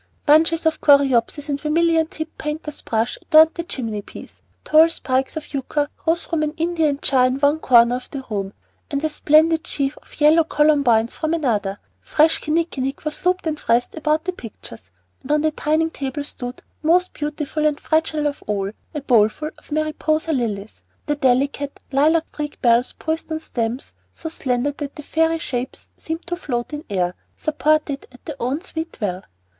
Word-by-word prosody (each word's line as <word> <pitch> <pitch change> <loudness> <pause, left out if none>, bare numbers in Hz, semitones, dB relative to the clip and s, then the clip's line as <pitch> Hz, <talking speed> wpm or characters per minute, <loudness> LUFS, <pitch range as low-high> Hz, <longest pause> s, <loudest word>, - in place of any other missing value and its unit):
Bunches 320 +2 +4
of 320 - +1
coreopsis 280 0 +3
and 285 -1 -2
vermilion 325 +1 +2
tipped 315 0 -8
painter's 300 0 -5
brush 225 +1 -1
adorned 315 0 +6
the 340 - -3
chimney 225 -10 -4
piece; - - -12 0.2
tall 315 +1 +6
spikes 265 -3 -1
of 310 - -8
yucca 290 +2 -1 0.2
rose 335 +1 +2
from 330 -2 -2
an 300 -1 -1
Indian 325 -3 +1
jar 255 -2 +4
in 255 +1 -1
one 290 +2 +3
corner 240 -3 +5
of 250 - -11
the 275 -2 -6
room, 195 -3 -3 0.4
and 285 -1 -2
a 315 - +1
splendid 315 +2 +3
sheaf 275 0 -2
of - - -18
yellow 310 +2 +6
columbines 280 -8 +3
from 315 +1 -1
another; 210 -10 -1 0.2
fresh 315 +1 +3
kinnikinick 305 -4 -2
was 305 0 -4
looped 365 -1 +1
and 310 -2 -2
wreathed 235 +1 +2
about 310 0 0
the 370 - -2
pictures; 115 - -11 0.3
and 290 - -1
on 300 - +3
the 310 0 +2
dining 315 +2 0
table 285 0 -4
stood, 250 -3 -7 0.2
most 355 +3 +2
beautiful 300 0 -3
and 300 -1 +1
fragile 315 -1 0
of 290 -1 -2
all, 200 -2 -1 0.2
a 295 - -2
bowlful 245 +4 +2
of - - -21
Mariposa 310 +1 0
lilies, 220 -5 -3 0.2
their 295 - 0
delicate, 280 +1 0
lilac 310 +4 +3
streaked 295 -1 -6
bells 235 +1 +3
poised 320 +1 -3
on 315 - -1
stems 240 -4 -4 0.2
so 325 - -8
slender 260 -3 -1
that 285 0 -7
the 300 - -8
fairy 325 +2 +1
shapes 260 -5 -5
seemed 325 +1 -6
to 350 - -2
float 250 -6 -4
in 295 +1 -5
air, 180 -3 0 0.2
supported 310 -2 0
at 250 - -18
their 305 - -5
own 265 +6 -1
sweet 330 -3 -6
will. 185 -4 -2
295 Hz, 175 wpm, -21 LUFS, 255-315 Hz, 0.4 s, adorned